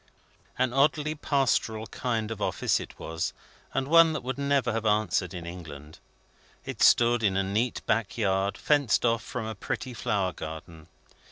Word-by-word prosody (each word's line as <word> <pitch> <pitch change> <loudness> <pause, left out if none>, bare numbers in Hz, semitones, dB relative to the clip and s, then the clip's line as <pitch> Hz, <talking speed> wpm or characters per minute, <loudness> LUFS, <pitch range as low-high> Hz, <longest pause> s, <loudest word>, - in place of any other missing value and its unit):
An 130 -1 +1
oddly 150 +2 +2
pastoral 130 -7 0
kind 115 0 -3
of 110 -2 -6
office - - +1
it - - -9
was, 80 0 -3 0.4
and 135 0 -1
one 165 +1 +6
that 155 - -4
would 130 +2 -4
never 140 -3 +1
have 115 0 -2
answered 105 -4 +1
in 90 -3 -7
England. 80 -4 -9 0.7
It - - -6
stood 120 0 +5
in 95 -3 +1
a 95 - +2
neat 110 +6 -1
back 110 -1 0
yard, 100 -2 0
fenced 145 -7 +2
off 115 -1 +2
from 115 +2 -5
a 110 - -4
pretty 125 +5 -5
flower 100 -5 -1
garden. 80 0 -9
110 Hz, 165 wpm, -27 LUFS, 95-130 Hz, 0.7 s, one